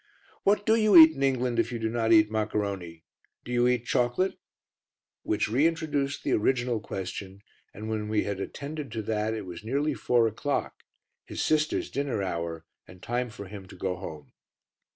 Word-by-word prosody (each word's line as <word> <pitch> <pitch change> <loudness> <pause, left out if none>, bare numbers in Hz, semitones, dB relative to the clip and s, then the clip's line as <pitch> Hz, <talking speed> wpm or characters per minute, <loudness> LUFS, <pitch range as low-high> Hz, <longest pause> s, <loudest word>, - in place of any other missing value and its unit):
"What 205 +1 +2
do 220 - +4
you 215 -4 +5
eat 160 -1 +11
in 140 - -8
England 125 -3 +1
if - - +1
you 120 - -3
do 110 -1 -1
not 115 0 0
eat 110 -1 +6
maccaroni? 100 -6 -2 0.4
Do - - -7
you 120 0 +3
eat 125 -1 +1
chocolate?" 125 +10 +1 0.9
Which 105 -1 0
reintroduced 145 +2 0
the - - -1
original 120 +1 +1
question, 95 -1 -6 0.3
and 105 +2 -8
when 110 -1 -2
we 110 -1 +1
had 100 -2 -3
attended 145 +5 -6
to 110 -2 -3
that, 110 +1 -1
it 105 -3 -5
was 90 +1 -8
nearly 140 +6 0
four 120 0 +2
o'clock, 135 +6 -2 0.5
his - - -8
sister's 155 0 +1
dinner 135 -7 -1
hour 85 -3 -4 0.2
and 90 - -14
time 120 +1 -1
for 100 -2 -9
him 95 -1 -9
to - - -12
go 95 -1 -2
home. 80 -5 -9
115 Hz, 175 wpm, -28 LUFS, 100-140 Hz, 0.9 s, eat